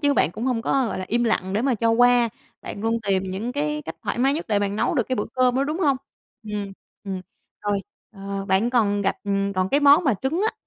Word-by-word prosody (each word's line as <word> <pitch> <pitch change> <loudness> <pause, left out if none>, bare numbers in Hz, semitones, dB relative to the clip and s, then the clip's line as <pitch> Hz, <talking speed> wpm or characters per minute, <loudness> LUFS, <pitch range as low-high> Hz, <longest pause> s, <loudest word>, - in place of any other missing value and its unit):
chứ 285 -2 +3
bạn 165 - +3
cũng 225 +4 -5
hông 245 -3 0
có, 265 -1 +1
gọi - - -3
là, 185 - -3
im 240 +2 +1
lặng 190 -4 0
để 215 +4 0
mà 265 -2 +2
cho 230 +1 +1
qua. 245 0 +5 0.3
Bạn 200 - -7
luôn 225 +1 +1
tìm 190 -1 +2
những 195 +6 -4
cái 300 +2 -2
cách - - -6
thoải - - -3
mái 270 +3 +3
nhất 325 - -3
để 205 -2 +2
bạn 205 0 -1
nấu 270 - +1
được 250 - +2
cái 255 - 0
bữa 210 - -1
cơm 255 -1 +3
đó, 270 - +2
đúng 305 +4 -3
hông? 280 -5 +3 0.5
Ừm, 205 -2 -5 0.3
ừm. 190 -2 -4 0.4
Rồi, 205 -1 0 0.3
ờ, 195 0 -5
bạn 200 +6 +2
còn 205 -5 +2
gặp - - 0 0.4
còn 185 0 +1
cái 285 - +2
món 290 +4 +6
mà 265 - +3
trứng 270 - -2
á, - - -3
230 Hz, 255 wpm, -23 LUFS, 200-265 Hz, 0.5 s, món